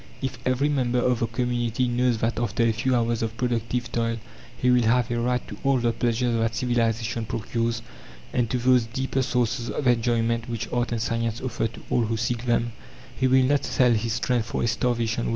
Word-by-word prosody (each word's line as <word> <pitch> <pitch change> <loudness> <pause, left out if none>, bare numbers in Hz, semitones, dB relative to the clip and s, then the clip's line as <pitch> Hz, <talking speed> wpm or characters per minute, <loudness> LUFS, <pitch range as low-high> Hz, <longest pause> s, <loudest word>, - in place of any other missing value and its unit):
If 130 -2 -4
every 130 +3 +2
member 130 -4 +1
of 125 -1 +2
the 115 - 0
community 120 0 -1
knows 120 0 +1
that 115 0 0
after 120 0 0
a 115 - +4
few 120 +4 0
hours 115 -1 +1
of 115 0 -3
productive 120 0 -1
toil 115 -1 0 0.4
he 125 - +2
will 125 0 +5
have 120 +1 +2
a 120 - 0
right 125 +1 0
to 105 - -8
all 135 -1 +3
the 120 -1 +1
pleasures 120 +1 0
that 115 0 0
civilization 115 -1 0
procures, 115 +1 -2 0.5
and 120 -3 +1
to 125 - 0
those 125 -1 +3
deeper 135 +2 -1
sources 125 -1 0
of 145 - -3
enjoyment 115 -1 +1
which 115 -1 -3
art 120 -1 0
and 115 -2 -1
science 115 0 -1
offer 120 -3 -1
to - - -12
all 120 - +3
who 115 +1 -1
seek 115 +1 -2
them, 120 0 +1 0.4
he 130 - +1
will 130 0 +5
not 140 +2 +2
sell 125 -2 +3
his 115 0 0
strength 120 0 0
for - - -2
a - - +2
starvation 115 0 0
wage. - - -1
120 Hz, 210 wpm, -25 LUFS, 115-125 Hz, 0.5 s, will